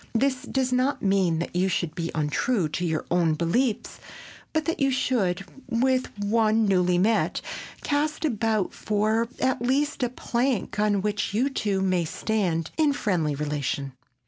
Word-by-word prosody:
This 255 +2 +1
does 260 -1 0
not 255 +3 +1
mean 190 -4 +2
that 170 +1 -4
you 185 +2 +2
should 170 -3 -1
be 165 -1 -3
untrue 160 +6 +1
to 175 - -3
your 160 -3 -1
own 170 -3 +3
beliefs, 205 - 0 0.5
but 315 -1 0
that 330 -1 -1
you 275 -1 +3
should, 215 -8 0 0.2
with 255 +2 +2
one 220 +1 +2
newly 180 -3 +3
met, 215 +5 +2 0.4
cast 300 +2 0
about 220 - 0
for 215 +2 0
at 260 -2 +1
least 275 +4 0
a 245 - +1
plank 240 -3 -1
on 205 -2 +2
which 210 -1 -1
you 260 +6 +2
two 200 -7 0
may 185 -2 +2
stand 170 -2 -1
in 305 -3 +3
friendly 170 - 0
relation. 140 -2 -2
210 Hz, 155 wpm, -26 LUFS, 175-255 Hz, 0.5 s, own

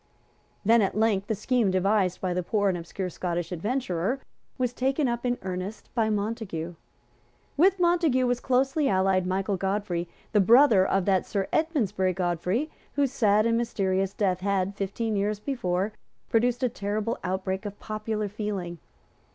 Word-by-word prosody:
Then 230 +2 +5
at 195 0 0
length 210 -3 +2
the 220 - 0
scheme 230 0 +1
devised 185 0 +1
by 185 -1 -1
the 180 - 0
poor 205 +2 +1
and 185 - 0
obscure 175 +2 -4
Scottish 175 0 -3
adventurer 205 +3 -1 0.4
was 250 -2 0
taken 270 +3 +1
up 240 +1 -1
in 245 0 0
earnest 185 +3 -5
by 225 -2 +1
Montague. 205 -6 -3 0.8
With 380 +5 +4
Montague 335 -7 +3
was 245 0 +1
closely 270 +3 +1
allied 190 -1 +2
Michael 195 +1 0
Godfrey, 190 -3 -2 0.2
the 210 - +4
brother 225 0 +6
of 190 -1 +1
that 190 -2 +2
Sir 195 -2 -1
Edmondsbury 210 - +1
Godfrey 180 - -1 0.2
whose 280 -3 +1
sad 215 -5 +3
and 230 0 +2
mysterious 195 -4 0
death 185 -3 +1
had, 195 0 0
fifteen 210 +3 -2
years 205 +1 0
before, 210 -5 -1 0.4
produced 240 +2 +2
a - - +4
terrible 210 +2 -2
outbreak 190 +1 -2
of 205 0 -9
popular 215 0 -3
feeling. 200 -5 -4
205 Hz, 155 wpm, -27 LUFS, 185-235 Hz, 0.8 s, brother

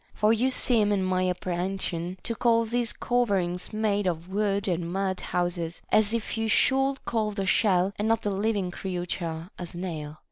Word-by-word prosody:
For 215 +1 +4
you 245 +4 +2
seem 230 -5 +2
in 200 -2 +1
my 185 0 +1
appre 180 -1 -2
hension 180 -1 -2
to 230 - -2
call 230 0 +3
these 235 +1 0
coverings 195 -8 0
made 210 -2 0
of 170 0 -2
wood 200 0 0
and 170 -2 -1
mud 190 0 -1
houses, 175 -1 -2
as 215 -1 +4
if 230 -2 -2
you 225 - 0
should 270 +4 +3
call 220 -2 0
the 200 -2 -3
shell 190 -1 +3
and 210 - +1
not 225 0 +2
the 205 - 0
living 200 -2 0
creature 175 -2 -4
a 180 - -4
snail. 160 -4 -5
195 Hz, 180 wpm, -27 LUFS, 180-220 Hz, -, For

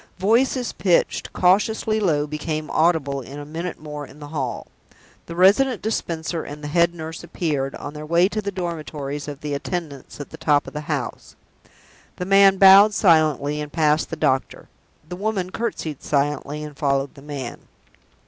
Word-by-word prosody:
Voices 245 +5 +1
pitched 180 -4 +1
cautiously 215 +4 +2
low 155 -8 +1
became 155 +1 -4
audible 155 -4 +1
in 135 +3 -10
a 145 - -7
minute 165 +4 -5
more 150 -1 -7
in 140 +1 -13
the 145 -1 -9
hall. 135 -5 -3 0.6
The 170 - -7
Resident 210 +7 +4
Dispenser 165 -6 -2
and 150 +1 -9
the - - -4
Head 170 +2 +2
Nurse 160 0 -7
appeared, 145 -6 -2
on 145 - -7
their 150 0 -8
way 170 +3 +4
to 215 +1 -3
the 200 - -3
dormitories 155 -5 -5
of 145 -1 -7
the 150 -1 -4
attendants 145 -2 -5
at 145 - -8
the - - -9
top 145 -1 +2
of - - -10
the 150 - -4
house. - - -4 0.8
The 180 - -4
man 195 0 +6
bowed 195 +2 +8
silently, 155 - +3
and 150 0 -6
passed 155 -1 +2
the - - -4
doctor; 135 -3 -1 0.4
the 180 - -6
woman 195 -2 -2
courtesied 160 - -4
silently, 145 +1 -1
and 150 -1 -8
followed 140 -1 0
the 140 - -14
man. 140 -4 -7
155 Hz, 170 wpm, -22 LUFS, 145-180 Hz, 0.8 s, bowed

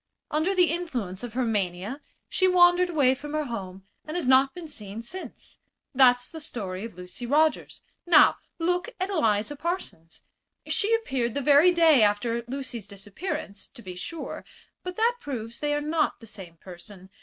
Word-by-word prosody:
Under 315 +6 +1
the 360 -3 +4
influence 250 - -3
of 240 -3 -7
her 255 0 0
mania 205 +4 -2 0.3
she 375 - +2
wandered 360 0 +5
away 285 -6 +3
from 295 +3 -8
her 305 0 0
home, 195 -7 -7 0.2
and 310 +3 -5
has 340 - -1
not 265 +1 +5
been 350 -2 -8
seen 215 -5 -7
since. 370 +11 -9 0.3
That's 250 -2 +4
the 320 - -7
story 200 -10 -5
of 225 -5 -9
Lucy 180 +7 -7
Rogers. 310 +4 +1 0.2
Now 345 - +6 0.2
look 360 +6 0
at 375 +2 -2
Eliza 225 - +1
Parsons. 325 - -5 0.4
She 450 +1 +2
appeared 265 - -2
the 285 - 0
very 290 +6 +6
day 325 -6 +5
after 230 +3 +1
Lucy's 255 -5 -5
disappearance, 205 - -6
to 235 - -12
be 185 -2 -7
sure; 320 - -6 0.4
but 365 0 -6
that 470 +2 +2
proves 235 -5 -5
they 295 0 0
are 295 - -1
not 305 +1 0
the 230 - -13
same 190 -6 -9
person. 185 +2 -12
265 Hz, 170 wpm, -26 LUFS, 210-330 Hz, 0.4 s, Now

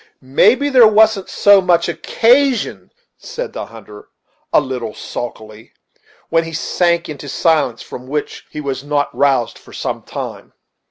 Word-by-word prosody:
"Maybe 215 - +3
there 250 -5 +7
wasn't 215 -2 +3
so 200 -1 +5
much 175 -2 +2
occasion," 245 +9 +1 0.3
said 485 0 -6
the - - -6
hunter, 105 -2 -13 0.4
a - - +5
little 125 -6 -5
sulkily; 110 -2 -8 0.6
when 165 0 +2
he 165 0 -8
sank 170 +2 0
into 145 -1 -8
a - - -7
silence 145 -5 +1
from 125 +1 -10
which 150 +2 -4
he 150 - -6
was 135 -2 -4
not 145 0 -1
roused 135 -4 +1
for - - -17
some - - -4
time. - - -8
155 Hz, 150 wpm, -17 LUFS, 130-205 Hz, 0.6 s, there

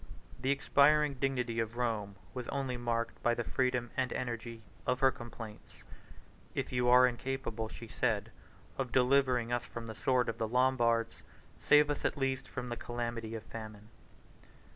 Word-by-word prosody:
The 130 - -1
expiring 145 +1 +4
dignity 125 -4 0
of 115 +1 -2
Rome 110 -5 -1 0.2
was 125 -2 -5
only 135 -2 -2
marked 120 -1 -2
by 120 0 +2
the 120 - -2
freedom 125 0 0
and 130 -1 0
energy 115 -2 -4 0.2
of 125 0 +1
her 135 0 +5
complaints: 115 -3 -10 0.7
"If - - -2
you 125 -1 +1
are 125 +1 +8
incapable," 120 -3 -2
she 115 - -9
said, 110 -2 -1 0.5
"of 130 -2 -1
delivering 125 -2 +3
us 120 - 0
from 115 -1 -7
the 110 - -6
sword 125 +1 +1
of 115 +1 -3
the 110 - 0
Lombards, 120 -2 +2 0.4
save 150 0 +5
us 145 - -3
at - - 0
least 135 -1 -1
from 125 -2 -5
the 120 - -2
calamity 120 -2 -4
of 110 - -6
famine." 110 -2 -9
120 Hz, 165 wpm, -33 LUFS, 115-130 Hz, 0.7 s, are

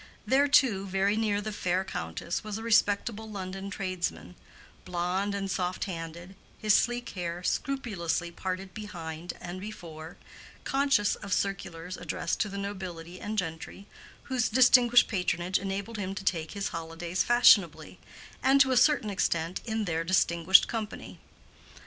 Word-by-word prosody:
There 275 +2 +4
too, 220 -9 +3
very 195 +2 +1
near 210 -2 0
the 215 +1 -4
fair 185 -2 0
countess, 80 - -4
was 215 -1 -4
a 225 - -7
respectable 220 0 +1
London 195 -1 -6
tradesman, 185 -3 -4 0.5
blonde 180 +3 -1
and 195 -1 -3
soft 180 0 -2
handed, 170 0 -6 0.2
his 215 -2 +2
sleek 240 +2 +1
hair 175 -1 -5
scrupulously 180 - -2
parted 185 +1 -5
behind 175 -5 -6
and 180 +1 -7
before, 165 -6 -9 0.5
conscious 270 -7 +2
of 200 - -8
circulars 185 -3 -3
addressed - - -3
to 210 - 0
the 200 - -6
nobility 185 -3 -6
and 215 +1 -4
gentry, 170 +2 -4 0.4
whose 255 -3 0
distinguished 245 0 +6
patronage 180 -2 0
enabled 200 +3 -4
him 195 -1 -3
to 195 - -6
take 160 -5 -1
his 200 -1 -2
holidays 165 +1 -3
fashionably, 205 -7 +4 0.4
and 270 +1 +4
to 265 -1 +5
a 255 - +3
certain 250 -5 +4
extent 170 -2 -1
in 220 -1 -1
their 165 -2 -1
distinguished 170 0 +4
company. 220 -2 -6
195 Hz, 145 wpm, -29 LUFS, 175-215 Hz, 0.5 s, distinguished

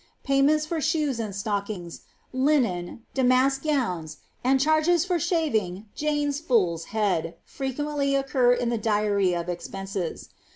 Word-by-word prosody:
Payments 280 +3 +3
for 320 0 -2
shoes 300 -5 0
and 210 -4 -4
stockings, 200 -4 -4 0.3
linen, 245 -8 0
damask 265 +1 +3
gowns, 180 - -1 0.3
and 265 +2 +3
charges 315 +4 +3
for 360 -2 +1
sliaving 305 - 0
^^ 190 +3 -10
Jane's 295 -1 -1
fool's 185 - +1
head^ 195 -6 -1
fre 270 - -6
quently 280 +1 0
occur 260 -2 +2
in 245 -1 +1
the 235 -2 -1
diary 205 -4 +1
of 170 0 -3
expenses. 190 0 -5
250 Hz, 135 wpm, -25 LUFS, 195-290 Hz, 0.3 s, Payments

